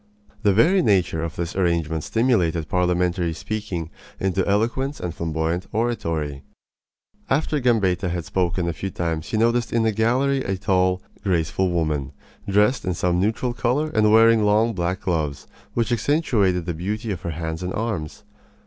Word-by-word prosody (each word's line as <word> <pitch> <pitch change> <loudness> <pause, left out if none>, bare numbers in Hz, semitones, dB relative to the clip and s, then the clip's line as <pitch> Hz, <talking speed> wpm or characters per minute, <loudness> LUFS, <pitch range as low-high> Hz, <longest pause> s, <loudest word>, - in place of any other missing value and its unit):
The 105 -3 +4
very 170 - +4
nature 95 - +2
of 80 -2 -4
this 85 0 -4
arrangement 85 -4 0
stimulated 90 -10 +1
parliamentary 90 -1 +1
speaking 90 -3 -4 0.3
into 95 0 0
eloquence 120 +8 0
and 90 -2 -4
flamboyant 80 +2 -2
oratory. 85 - -2 0.9
After 150 +2 +1
Gambetta 105 -7 +1
had 85 -2 -3
spoken 90 -1 -1
a 85 - -1
few 95 +4 -4
times 85 -2 -3
he 110 +1 -2
noticed 115 +1 +2
in 115 -1 +2
the 110 - +2
gallery 130 +6 +1
a 95 0 -2
tall, 95 -1 +1 0.2
graceful 90 0 +1
woman, 75 -5 -1 0.4
dressed 105 +6 +3
in 90 -2 -1
some 90 +1 +1
neutral 110 +5 0
color 140 +6 0
and 105 -1 +4
wearing 115 0 +6
long 110 +3 +3
black 90 0 -2
gloves, 80 -6 -2 0.3
which 115 0 0
accentuated 110 - +1
the 85 - -2
beauty 105 +7 -3
of 95 - -4
her 85 - -4
hands 80 +1 -4
and 90 0 -3
arms. 105 -10 -3
95 Hz, 160 wpm, -23 LUFS, 85-115 Hz, 0.9 s, wearing